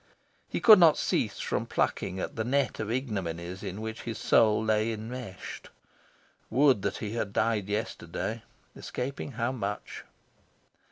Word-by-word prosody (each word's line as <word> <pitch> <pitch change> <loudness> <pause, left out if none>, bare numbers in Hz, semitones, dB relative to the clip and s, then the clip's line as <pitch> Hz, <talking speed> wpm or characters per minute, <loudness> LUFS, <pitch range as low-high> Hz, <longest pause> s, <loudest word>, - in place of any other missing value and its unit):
He - - -2
could 220 -4 +9
not 165 -4 +7
cease - - 0
from - - -2
plucking 95 - -1
at - - -4
the 110 - -1
net 140 +4 0
of 110 - -3
ignominies 95 -7 -3
in 100 +1 -5
which 110 0 -5
his 115 -2 -5
soul 110 -1 +4
lay 110 +1 +2
enmeshed. 110 -2 -7 0.8
Would 130 -2 +4
that 100 0 -2
he 105 - -4
had 110 -4 -2
died 110 -3 +1
yesterday, 105 +2 -3 0.3
escaping 135 +2 -5
how 120 +2 -1
much! 105 -5 -5
110 Hz, 145 wpm, -29 LUFS, 100-125 Hz, 0.8 s, could